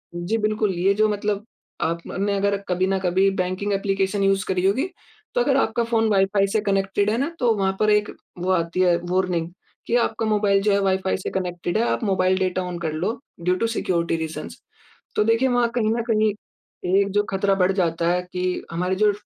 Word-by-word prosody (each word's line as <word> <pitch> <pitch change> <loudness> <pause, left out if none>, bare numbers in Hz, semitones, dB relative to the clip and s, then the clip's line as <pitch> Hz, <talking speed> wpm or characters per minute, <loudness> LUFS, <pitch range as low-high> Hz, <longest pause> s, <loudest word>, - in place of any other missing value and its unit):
जी। 175 +6 -1
बिल्कुल 215 -1 0
ये 195 +3 +3
जो 215 +1 +3
मतलब 205 0 -2 0.4
आपने 180 +4 -1
अगर 200 0 +1
कभी 185 +1 +1
न 195 0 0
कभी 190 +1 +2
बैंकिंग 185 +3 -2
ऐप्लीकेशन 195 0 0
यूज़ 195 -1 +2
करी 185 0 0
होगी 260 - +1 0.5
तो - - +3
अगर - - +2
आपका 235 - +1
फ़ोन 225 -1 +1
वाइ-फ़ाई 195 0 +3
से 210 +2 0
कनेक्टेड 200 0 +1
है 225 - 0
ना 275 +5 0
तो 240 -3 +3
वहाँ 190 -1 0
पर 215 - +3
एक 210 0 +2 0.3
वो 180 +2 0
आती 170 0 0
है 180 -2 +4 0.2
वार्निंग 180 -2 0 0.4
कि 235 - +1
आपका 225 0 -3
मोबाइल 205 -2 +2
जो 210 - +3
है 200 - +3
वाइ-फ़ाई 190 -1 +1
से 185 - -4
कनेक्टेड 175 0 -2
है 225 - +2
आप - - -1
मोबाइल 185 -2 +2
डेटा 185 0 0
ऑन 180 -1 -5
कर 160 -2 -3
लो 185 +9 -2 0.2
ड्यू 180 +1 +2
टु 230 +5 0
सिक्योरिटी 170 -7 -1
रीज़न्स। 160 0 -6 0.6
तो - - +4
देखिए 230 +4 +3
वहाँ 245 -1 +2
कहीं 220 -3 +1
न 235 - -1
कहीं 215 -1 +2 0.7
एक 200 0 +1
जो 205 +1 +2
ख़तरा 195 +1 +1
बढ़ 185 0 +2
जाता 170 -3 0
है 180 +1 +1
कि 180 0 -2 0.3
हमारी 180 +3 -1
जो 210 +2 +3
195 Hz, 205 wpm, -23 LUFS, 185-210 Hz, 0.7 s, है